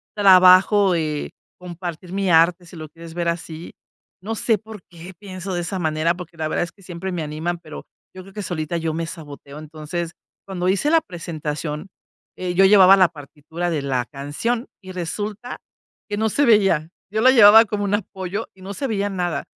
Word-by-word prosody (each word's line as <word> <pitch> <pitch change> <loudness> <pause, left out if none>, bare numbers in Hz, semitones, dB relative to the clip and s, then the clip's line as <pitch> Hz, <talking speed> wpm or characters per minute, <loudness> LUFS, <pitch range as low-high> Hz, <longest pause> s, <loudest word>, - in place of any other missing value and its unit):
trabajo, 190 0 +6
eh, 155 -3 -2 0.3
compartir 175 0 -7
mi 195 -1 -1
arte 170 +2 +4
si 175 - -14
lo 155 -1 -8
quieres 165 +1 -12
ver 170 -1 -2
así. 170 0 -6 0.5
No 220 +4 -4
sé 225 0 +1
por 215 -1 -12
qué 175 +2 -12
pienso 185 -1 -7
de 175 - -1
esa 185 +2 -4
manera, 160 0 0
porque 175 -1 -11
la 155 - -2
verdad 155 - -1
es 175 - -6
que, 195 - -22
siempre 180 +1 -6
me 175 -3 -3
animan, 155 +3 -3
pero, 155 -3 -10 0.3
yo 185 - -9
creo 195 +1 -15
que 210 - -5
solita 170 -2 -3
yo 165 -1 -2
me 165 +1 -3
saboteo, 145 -3 -10
entonces, 155 +2 -6 0.3
cuando 185 -2 -2
hice 200 +10 +1
la 325 0 +4
presentación, 155 - -6 0.5
eh, 180 -1 -3
yo 190 +2 +4
llevaba 195 -1 +8
la 185 -3 +5
partitura 155 +2 -6
de 155 -4 -1
la 130 -3 -1
canción 150 - -3
y 185 - -10
resulta 205 +6 -5 0.5
que 205 - -2
no 220 +1 +1
se 285 +7 +1
veía. 195 - +3 0.2
Yo 215 - -1
la 260 +2 +7
llevaba 225 -2 +8
como 205 -1 -3
un 200 0 -1
apoyo 195 0 -3
y 190 - -20
no 195 +2 -7
se 275 +7 -3
veía 205 -3 -1
nada. 175 -6 -2
180 Hz, 195 wpm, -21 LUFS, 160-200 Hz, 0.5 s, llevaba